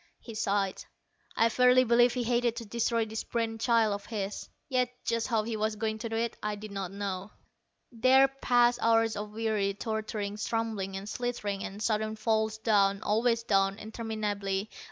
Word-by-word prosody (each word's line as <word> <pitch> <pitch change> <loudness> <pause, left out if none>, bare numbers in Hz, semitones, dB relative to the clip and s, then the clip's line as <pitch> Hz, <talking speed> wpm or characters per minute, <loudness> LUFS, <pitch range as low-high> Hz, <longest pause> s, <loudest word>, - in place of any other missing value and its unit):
He 230 - -10
sighed. 200 -2 -1 0.5
I 230 - +4
verily 250 +2 +5
believe 240 +1 +4
he 250 - 0
hated 240 0 +1
to 230 - -6
destroy 230 +1 0
this 220 0 -4
brain 225 -1 -2
child 225 -2 +3
of 200 - -6
his. 205 -3 -4 0.2
Yet 255 -2 +1 0.2
just 230 0 0
how 225 -3 +1
he 225 +1 -3
was 215 0 -1
going 220 0 -2
to 230 - -4
do 225 - -3
it, 230 0 -1
I 210 0 -2
did 210 0 -9
not 195 -2 -4
know. 195 -1 -4 0.6
There 260 +3 +5
passed 245 -3 +2
hours 225 -1 +3
of 210 +1 -4
weary, 210 -2 -1
tortured 215 -1 -3
stumblings, 215 -4 -2
and 195 +1 -7
slitherings, 210 -4 -3
and 205 +2 -6
sudden 215 0 0
falls 220 0 0
down, 200 -2 +2
always 230 +2 +2
down, 195 -2 +2
interminably. 215 -3 -3
220 Hz, 175 wpm, -29 LUFS, 205-230 Hz, 0.6 s, verily